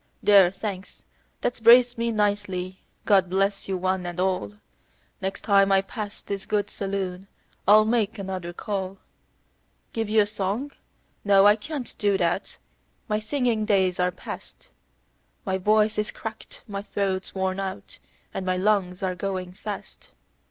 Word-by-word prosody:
"There, 200 -3 +7
thanks, 195 0 -7 0.4
that's 245 - -1
braced 240 +2 +7
me 235 0 -1
nicely; 200 -3 -1 0.2
God 195 -4 +4
bless 195 +2 0
you 190 -1 -1
one 185 0 -1
and 175 0 -5
all; 185 - 0 0.7
Next 190 +1 -3
time 200 -2 +4
I 195 0 +4
pass 205 0 -6
this 200 -1 -5
good 205 -1 0
saloon 195 -1 -4 0.4
I'll 215 +1 +7
make 225 -1 +1
another 190 -3 -4
call. 195 +1 -4 1.0
Give 225 -2 -2
you 215 0 +5
a - - +3
song? 205 +6 -3 0.5
No, 200 -1 +5
I 205 0 +7
can't 260 +3 -6
do 200 -2 +2
that; 175 +1 -1 0.5
my 210 -2 0
singing 235 -1 0
days 190 -4 +2
are 180 0 +3
past; 180 - -9 0.8
My 190 -2 -1
voice 215 +2 +3
is 210 - -1
cracked, 220 -1 -8
my 200 -2 -4
throat's 195 -2 -2
worn 190 0 -1
out, 190 -1 -6 0.3
and - - -3
my 185 0 0
lungs 190 -2 +1
are 185 -1 0
going 185 0 -4
fast. 205 +2 -8
195 Hz, 150 wpm, -25 LUFS, 185-215 Hz, 1.0 s, There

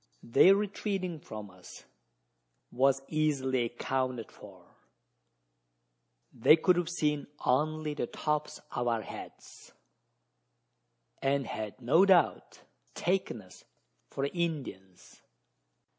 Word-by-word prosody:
Their 185 +11 +6
retreating 195 -4 -2
from 105 -7 -9
us 90 -1 -14 0.9
was 135 +2 +2
easily 135 -5 0
accounted 125 0 -3
for: - - -14 1.7
they 115 - +6
could 180 +3 +3
have 175 -1 -1
seen 150 -4 -1 0.2
only 155 +4 +1
the 145 - -3
tops 150 0 -2
of 120 0 -2
our 115 -2 0
heads, - - -11 1.5
and 135 0 +1
had 110 -2 -6
no 145 +10 +4
doubt 185 -5 +2 0.3
taken 175 - -1
us 95 - -17 0.5
for 135 - -2
Indians! 140 - -5
140 Hz, 100 wpm, -30 LUFS, 120-165 Hz, 1.7 s, Their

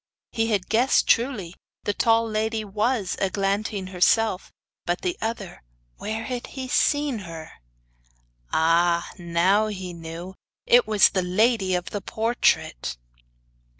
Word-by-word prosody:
He 225 0 0
had 205 -5 0
guessed 240 +4 +3
truly: 230 -8 +1 0.3
the 205 - 0
tall 230 +2 +2
lady 220 0 -1
was 210 0 -1
Eglantine 195 0 -1
herself; 190 +2 +2 0.3
but 175 +1 -2
the 360 -1 -1
other 220 -5 -4 0.4
where 220 +1 -4
had 245 +1 -5
he 260 -1 -4
seen 290 -1 +1
her? 165 -4 -9 1.0
Ah! 170 +1 +2
now 175 +5 +2
he 185 -4 -6
knew 170 +2 -8 0.3
it 245 -2 +5
was 215 -2 +5
the 185 - 0
lady 190 +1 +2
of 180 0 -4
the 205 - -4
portrait! 220 - 0
205 Hz, 125 wpm, -24 LUFS, 180-225 Hz, 1.0 s, it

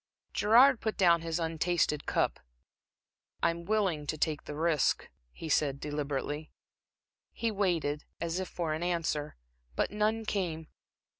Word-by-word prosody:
Gerard 245 +4 +6
put 220 -1 -2
down 170 -4 +5
his 165 0 -2
untasted 165 -2 0
cup. - - +1 1.0
"I'm 170 0 +1
willing 190 -8 0
to 155 - -2
take 155 0 -1
the 150 - -6
risk," 160 -2 +1 0.2
he 165 - -8
said, 145 -2 +1
deliberately. 150 +1 -3 0.8
He 230 -1 -1
waited, 170 -8 0
as 170 +1 -2
if 185 - -3
for 165 -3 -2
an 155 - -3
answer, 165 -4 -1 0.4
but - - 0
none 215 +2 0
came. 165 -7 -2
165 Hz, 135 wpm, -31 LUFS, 150-190 Hz, 1.0 s, Gerard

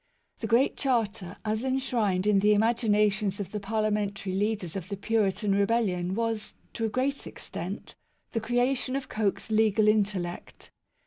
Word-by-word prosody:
The 225 - -3
Great 235 +5 +3
Charter, 225 -8 -1
as 215 +2 -1
enshrined 245 -8 0
in 210 -2 +4
the 210 +1 +4
imaginations 210 -3 +2
of 200 - -4
the 210 - -3
parliamentary 205 -2 -1
leaders 200 -3 -1
of 185 -1 -5
the 200 - -4
Puritan 205 -1 +1
Rebellion 195 -3 +1
was, 225 -1 -2 0.2
to 225 - -2
a - - 0
great 265 +5 -1
extent, - - -7 0.4
the 225 - -1
creation 245 +3 0
of 275 -1 -4
Coke's 215 0 -1
legal 215 -1 +3
intellect. 200 -5 -1
215 Hz, 145 wpm, -28 LUFS, 200-230 Hz, 0.4 s, in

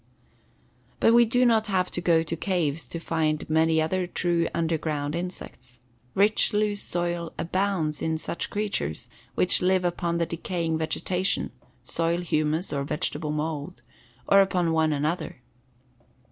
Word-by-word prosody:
But 225 - +5
we 235 0 +7
do 245 +3 +2
not 225 -2 +3
have 185 -3 0
to 175 - -3
go 165 -2 +3
to 165 - -4
caves 165 -4 -1
to - - -6
find 155 -2 -1
many 160 +1 +3
other 180 +3 0
true 170 -1 0
underground 155 -3 -1
insects. 170 -7 -6 0.4
Rich, 210 +3 +3
loose 210 -1 +1
soil 175 -1 -2
abounds 175 -4 -1
in 160 0 0
such 165 - -4
creatures 205 - -3 0.2
which 180 - +3
live 185 0 +2
upon 170 -1 -1
the 170 - +1
decaying 165 -1 -2
vegetation 180 +4 0 0.3
(soil 170 +1 0
humus 155 0 0
or 140 -1 -1
vegetable 150 +1 -2
mold) 150 +2 -4 0.4
or 195 0 +7
upon 180 -3 +1
one 160 -1 +2
another. 150 -3 -2
170 Hz, 140 wpm, -26 LUFS, 155-185 Hz, 0.4 s, we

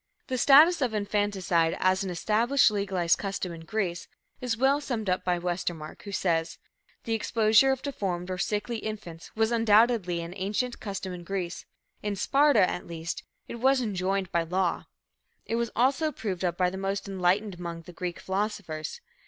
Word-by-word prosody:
The 255 - -1
status 305 +6 +7
of 245 -4 0
infanticide 200 -5 +1
as 185 +1 +2
an 190 - -3
established, 220 +9 +3
legalized 190 -4 +1
custom 195 -2 -3
in 165 -1 -10
Greece, 185 -4 -2 0.3
is 245 -3 -1
well 270 +4 +3
summed 225 -9 -2
up 180 - 0
by 180 -1 +1
Westermark, 175 -3 -4
who 200 - -8
says: 165 -4 0 0.5
"The 230 - -2
exposure 225 +2 +4
of 265 -1 -2
deformed 185 -10 -3
or 185 - -3
sickly 210 +4 -1
infants 210 -7 -7
was 220 +1 +2
undoubtedly 220 -5 +3
an 170 +1 -7
ancient 210 +6 -2
custom 195 -2 -5
in 175 -1 -8
Greece; 180 -1 -4 0.3
in 205 -1 -2
Sparta, 275 -1 +4
at - - -4
least, 165 0 -5 0.3
it 235 - -7
was 265 +2 +4
enjoined 195 -4 -1
by 170 - +2
law. 180 +1 -1 0.6
It 230 - -1
was 235 -1 0
also 270 +7 +2
approved 200 - -4
of 175 -2 0
by 180 -1 +2
the 190 - -6
most 195 +1 -2
enlightened 195 +2 +1
among 170 -1 -6
the 180 - -12
Greek 175 0 -5
philosophers. 190 - -3
195 Hz, 170 wpm, -27 LUFS, 180-225 Hz, 0.6 s, status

